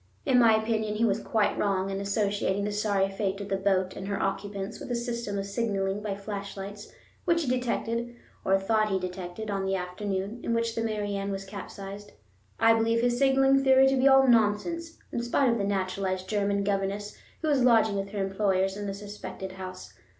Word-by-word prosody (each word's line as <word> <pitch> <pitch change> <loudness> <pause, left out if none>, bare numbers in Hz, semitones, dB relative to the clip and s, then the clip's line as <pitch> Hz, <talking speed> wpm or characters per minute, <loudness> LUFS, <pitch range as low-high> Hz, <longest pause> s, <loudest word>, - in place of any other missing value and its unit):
In 260 -3 +4
my 230 -2 +6
opinion 220 -1 -1
he 230 +2 +2
was 210 -1 +1
quite 215 -3 +1
wrong 195 -1 0
in 195 0 -3
associating 200 -1 0
the 210 - -1
sorry 205 -2 +1
fate 195 0 -2
of 200 0 -6
the 195 - +1
boat 190 -1 +1
and 195 - -6
her 200 -1 -2
occupants 195 0 -3
with - - -8
a 245 - 0
system 235 -3 -3
of 195 - -2
signaling 200 -2 -1
by 205 -2 -3
flashlights 200 0 -7 0.3
which 335 -2 +2
he - - -4
detected 240 -1 -1 0.3
or 195 0 +3
thought 215 +2 +1
that 205 - -2
he 190 - +2
detected, 185 +3 -5
on 195 -1 -1
the 190 0 0
afternoon 190 +4 -3
in 230 - 0
which 230 0 0
the 230 - -2
Mary 210 -2 -2
Ann 200 0 -2
was 195 0 -4
capsized. 200 +1 -8 0.5
I 225 0 +6
believe 225 +1 +2
his 245 0 +2
signaling 270 0 +4
theory 265 0 +6
to 270 - +2
be 265 +1 +4
all 270 0 +6
nonsense, 245 +10 +2
in 235 - -2
spite 240 +2 +2
of 235 - 0
the - - 0
naturalized 185 -1 -1
German 200 -1 0
governess 200 +1 -2 0.3
who - - 0
was 280 -4 +3
lodging 225 -4 +4
with 195 0 -2
her 200 -1 -2
employers 195 -1 +1
in 205 0 -4
the 195 - -3
suspected 200 -2 -7
house. 185 -1 -8
205 Hz, 205 wpm, -28 LUFS, 195-230 Hz, 0.5 s, my